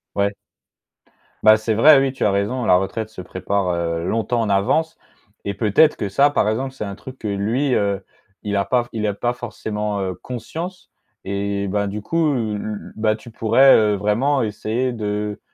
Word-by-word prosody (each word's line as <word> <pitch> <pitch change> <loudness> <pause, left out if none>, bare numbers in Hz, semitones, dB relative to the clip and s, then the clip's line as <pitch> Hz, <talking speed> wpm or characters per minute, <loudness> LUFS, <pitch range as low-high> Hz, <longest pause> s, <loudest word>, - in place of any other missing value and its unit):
Ouais. 100 0 +1 1.1
Bah, 110 0 +7
c'est 110 0 -1
vrai, 140 +5 +7
oui 135 -1 0
tu - - -2
as 105 - +4
raison, 105 +6 -1
la 90 - +5
retraite 110 +4 -2
se 105 - -10
prépare, 95 +1 -2
heu, 85 -1 -2
longtemps 115 +3 0
en 110 - 0
avance 100 +12 +1 0.5
et 100 - -2
peut-être 110 +10 +3
que 100 - -2
ça 140 +9 +3
par 105 - +1
exemple, 130 +5 -2
c'est 105 - -5
un 100 - -5
truc 130 +5 -11
que 110 - -5
lui, 115 +7 0
heu, 100 -1 0 0.4
il 105 -1 -1
a 100 - +1
pas 125 +1 +1
f - - -18
il 110 -1 -1
a 105 - 0
pas 120 +4 -2
forcément, 105 -3 -4
heu, 95 -1 -2
conscience 160 - -7 0.3
et 100 0 -2
ben, 100 +1 0
du 100 +2 -4
coup, 155 +6 +1
l 110 -4 -1
l 105 0 -6
bah, 110 0 +1
tu 115 +2 -11
pourrais, 130 +5 +5
heu, 105 -1 +3
vraiment 110 +8 +1
essayer 115 +3 -1
de 105 -2 -3
110 Hz, 195 wpm, -21 LUFS, 100-125 Hz, 1.1 s, Bah